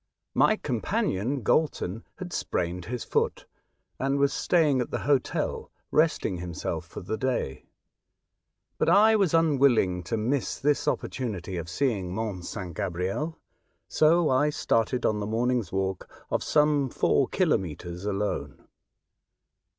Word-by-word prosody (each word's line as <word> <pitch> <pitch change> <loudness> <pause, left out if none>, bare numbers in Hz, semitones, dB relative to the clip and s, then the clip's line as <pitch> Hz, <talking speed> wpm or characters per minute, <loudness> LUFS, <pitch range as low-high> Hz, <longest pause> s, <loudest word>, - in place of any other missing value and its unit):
My - - +4
companion, 120 +7 -1
Galton, 115 - 0
had 180 -2 -7
sprained 90 0 -2
his 125 +1 -4
foot, - - -1 0.5
and 135 +1 +1
was 140 0 +2
staying 150 -7 +2
at 125 - -3
the - - -2
hotel 140 -2 0 0.2
resting 155 - +2
himself 85 -2 -4
for - - -8
the 110 +5 -3
day, 125 - -2 1.1
but - - +2
I 215 +5 +6
was 195 -6 +2
unwilling 135 - +3
to 115 - -1
miss 120 +5 -1
this 145 +1 +1
opportunity 105 -11 -2
of 85 -1 -5
seeing 95 -4 -1
Mont 105 -5 -3
St. 90 -4 -6
Gabriel; 95 - -2 0.5
so 160 +2 +4
I 140 +3 +3
started 125 -3 0
on 105 -1 +1
the 105 - -3
morning's 120 -2 0
walk 95 -1 -2 0.2
of - - 0
some 150 -3 +3
four - - +2
kilometres 85 0 -1
alone. 105 0 -3
120 Hz, 130 wpm, -27 LUFS, 95-145 Hz, 1.1 s, I